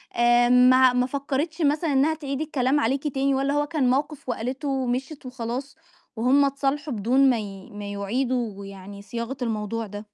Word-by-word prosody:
آآ، 240 0 +4
ما 250 0 +6
ما 250 0 +2
فكَرِتش 285 +4 -3
مثلًا 295 +1 +1
إنها 285 +4 +3
تعيد 280 -2 -4
الكلام 285 -2 +1
عليكِ 275 +4 0
تاني 275 0 0
والّا 275 +1 0
هو 290 0 +1
كان 290 -5 0
موقف 280 0 -1
وقالته 255 +5 -3
ومشيت 265 +2 -2
وخلاص، 255 +3 -5 0.4
وهُم 260 +5 +3
اتصالحوا 275 +1 -1
بدون 255 +6 +3
ما 240 -3 +2
ي 195 -1 -8
ما 205 0 -7
يعيدوا 220 0 -2
يعني 195 +1 -10
صياغة 235 +5 -5
الموضوع 225 -1 -2
ده؟ 205 +1 -8
255 Hz, 165 wpm, -24 LUFS, 230-280 Hz, 0.4 s, ما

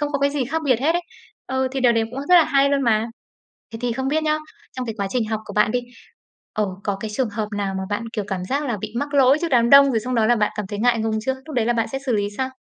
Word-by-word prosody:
Không 295 0 -2
có 280 - 0
cái 280 0 +2
gì 280 -3 -1
khác 315 +6 -2
biệt 255 -5 +3
hết 315 +4 +2
ấy. 350 +1 -1 0.4
Ừ, 260 0 -1
thì 270 - -2
điều 245 -2 +4
đấy 225 -1 +1
cũng 260 - -7
rất 360 - +6
là 340 - +7
hay 280 -1 +3
luôn 280 -1 +1
mà. 225 -2 +2 0.7
Thế 225 - -6
thì 245 -1 0
không 265 +2 -2
biết 310 +2 +1
nhá, 305 0 +1 0.4
trong 255 -1 -3
cái 225 - -4
quá 200 - -1
trình 245 -3 0
học 215 -1 -1
của - - -9
bạn 210 +1 +3
đi, 245 - 0 0.7
ờ, 210 -1 0 0.2
có 200 -1 -1
cái 215 0 -4
trường 225 +1 -1
hợp 210 0 -3
nào 195 -1 -2
mà - - -3
bạn, 205 +3 -2
kiểu, 210 -3 -3
cảm 185 -2 -3
giác 280 +9 -1
là 235 - -1
bị 215 0 -6
mắc 285 0 -3
lỗi 270 +1 +5
trước 340 - -1
đám 235 -2 +3
đông, 280 0 +8
rồi 225 - +1
xong 250 +3 -3
đó 225 -2 +3
là 240 +1 +4
bạn 210 -1 +1
cảm 210 -2 -3
thấy 205 +1 -6
ngại 235 0 +2
ngùng 220 0 -1
chưa? 265 +4 -1
Lúc 310 - -8
đấy 230 -2 +1
là 240 - +3
bạn 230 -1 -1
sẽ 270 - -2
xử 250 - +1
lý 205 -1 +1
sao? 260 0 -2
245 Hz, 320 wpm, -22 LUFS, 220-275 Hz, 0.7 s, đông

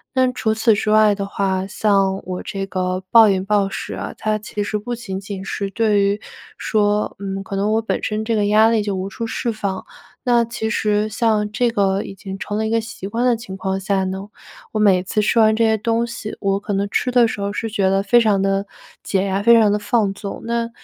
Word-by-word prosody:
那 255 -1 +3
除 220 -3 0
此 220 0 +3
之 210 +1 -1
外 215 -1 +5
的 200 0 -3
话， 190 -1 -1
像 195 -1 +1
我 180 0 -5
这 195 -1 -4
个 185 -1 -2
暴 225 -2 +7
饮 190 -1 +1
暴 200 -1 +2
食 - - -5
啊， - - -5
它 215 0 -1
其 210 0 -4
实 210 +1 -2
不 240 +4 -5
仅 220 -5 -5
仅 195 -1 -7
是 195 0 -4
对 210 -2 +2
于 200 +2 0 0.3
说， 210 -1 0
嗯， 195 0 -4
可 195 - -6
能 205 +2 +1
我 225 - +2
本 225 - -3
身 215 0 -2
这 225 +1 -1
个 210 -1 +1
压 215 +2 +5
力 225 -2 +1
就 205 -1 -2
无 190 +1 -3
处 230 +4 -5
释 230 +1 -2
放， 200 -3 -4 0.4
那 240 -2 +3
其 225 -1 -4
实 210 0 0
像 215 -1 0
这 240 +2 +1
个 195 -2 +1
已 - - -8
经 195 0 -8
成 205 +2 -4
了 220 - 0
一 - - -2
个 230 0 +2
习 220 -3 -7
惯 230 +4 -1
的 245 -1 +4
情 205 -4 -8
况 190 0 -2
下 195 0 0
呢， 190 +2 -4 0.5
我 215 - -1
每 195 -4 +4
次 195 +3 -2
吃 215 +2 +2
完 220 0 +5
这 230 0 +2
些 220 0 +2
东 230 +2 0
西， 230 -2 -7
我 195 -1 +1
可 205 0 -4
能 200 +1 0
吃 - - 0
的 245 -2 +4
时 205 - -5
候 200 0 -2
是 225 +2 -3
觉 200 -3 +1
得 195 +1 +1
非 240 +4 +4
常 210 -3 +2
地 195 +1 0 0.3
解 195 -1 0
压， 195 0 -1
非 235 +1 +6
常 215 -2 +4
地 210 - +1
放 210 -3 +1
纵。 200 0 -7
那， 235 0 -1
210 Hz, 260 characters per minute, -20 LUFS, 195-225 Hz, 0.5 s, 暴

